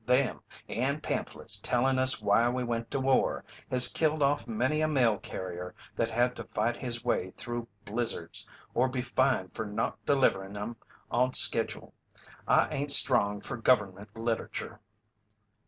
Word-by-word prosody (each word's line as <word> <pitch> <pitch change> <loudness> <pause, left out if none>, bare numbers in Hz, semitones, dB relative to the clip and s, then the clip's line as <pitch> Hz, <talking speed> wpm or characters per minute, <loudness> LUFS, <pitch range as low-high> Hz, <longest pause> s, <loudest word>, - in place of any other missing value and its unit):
Them, 125 +3 +1 0.3
and 140 +6 -2
pamphlets 100 - -3
tellin' 130 +4 +1
us 130 0 +6
why 115 +4 +3
we 125 +1 -2
went 115 -1 -3
to 135 - -2
war, 135 0 +1 0.3
has 125 -1 +7
killed 155 -2 0
off 140 -4 0
many 130 +7 -1
a 155 - +2
mail 125 -8 +2
carrier 90 -1 -7 0.2
that 115 - -1
had 120 +2 0
to - - -6
fight 115 +3 -2
his 120 -1 -6
way 95 -6 -1
through 120 -1 -5 0.2
blizzards, 110 -6 -2 0.2
or 130 +2 +1
be 125 -1 -3
fined 130 -6 0
fer - - -4
not 105 +1 -4
deliverin' 100 -8 +1
'em 105 +3 -5 0.4
on 125 +2 +1
schedule. - - +3 0.5
I - - +4
ain't 145 0 -3
strong 110 -7 +6
fer 120 - -6
gover'mint 105 -4 0
literature." 115 0 -4
120 Hz, 155 wpm, -29 LUFS, 110-130 Hz, 0.5 s, has